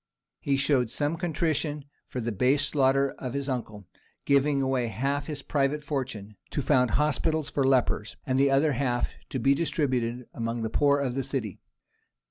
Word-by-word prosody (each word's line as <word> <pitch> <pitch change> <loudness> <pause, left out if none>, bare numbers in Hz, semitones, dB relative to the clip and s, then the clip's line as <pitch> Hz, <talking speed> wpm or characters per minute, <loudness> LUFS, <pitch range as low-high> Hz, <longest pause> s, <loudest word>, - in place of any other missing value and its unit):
He 140 -1 0
showed 135 -4 +2
some 145 +6 -1
contrition 155 -3 -1 0.2
for 125 - -5
the 120 0 -2
base 130 +7 +2
slaughter 135 -1 +2
of 130 0 -5
his 140 0 -2
uncle, 110 -6 -4 0.4
giving 140 0 +3
away 130 -3 0
half 140 +5 -2
his 145 -3 -5
private 145 +1 0
fortune 125 -8 -4
to 145 - -2
found 125 -1 +3
hospitals 155 +1 +1
for 140 - +1
lepers, 130 -5 +1
and 130 0 +1
the 140 0 +4
other 140 +3 +3
half 125 -2 0 0.2
to - - -3
be 135 +3 +3
distributed 130 -6 -1
among 115 0 -3
the 110 - -3
poor 145 -1 +3
of 135 -3 -1
the 135 - -1
city. 130 -7 -3
135 Hz, 170 wpm, -27 LUFS, 125-145 Hz, 0.4 s, the